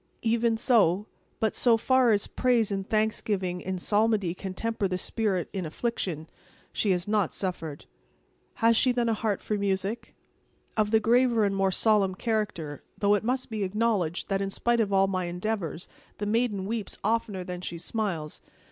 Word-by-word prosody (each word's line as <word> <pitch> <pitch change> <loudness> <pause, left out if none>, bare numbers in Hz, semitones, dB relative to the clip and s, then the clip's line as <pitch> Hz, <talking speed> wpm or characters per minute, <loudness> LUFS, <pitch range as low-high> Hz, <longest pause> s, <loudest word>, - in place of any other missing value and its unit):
"Even 230 0 +2
so. 210 -5 +3 0.3
But 220 -2 +1
so 235 -2 +4
far 255 +1 +3
as 205 -1 +2
praise 240 -4 +1
and 195 -1 -3
thanksgiving 205 -4 0
in 190 0 -3
psalmody 205 -1 +2
can 185 0 -7
temper 225 -1 -1
the 185 -1 -2
spirit 195 -2 -1
in 190 -2 -2
affliction, 165 -2 -3 0.5
she 210 - 0
has 180 -1 +1
not 210 -4 +1
suffered." 165 -6 -4 0.7
"Has 230 0 +4
she 255 +3 +4
then 240 -1 0
a - - +2
heart 215 -2 -1
for 210 - -1
music?" 200 +2 -2 0.6
"Of 215 -1 +2
the 220 0 +4
graver 235 0 +3
and 200 -1 0
more 195 0 +2
solemn 195 -1 +2
character; 205 -10 -2 0.2
though 205 -1 +3
it 205 - +1
must 250 +1 -1
be 215 -1 -3
acknowledged 195 -4 0
that, 195 0 0
in 195 - -1
spite 235 +4 +1
of 205 -2 -1
all 195 0 +4
my 185 -2 -1
endeavors, 180 -1 -3 0.3
the 205 - -3
maiden 210 -3 0
weeps 220 0 -4
oftener 210 -3 0
than 180 0 -6
she 175 - -5
smiles. 170 -5 -3
205 Hz, 175 wpm, -27 LUFS, 185-225 Hz, 0.7 s, so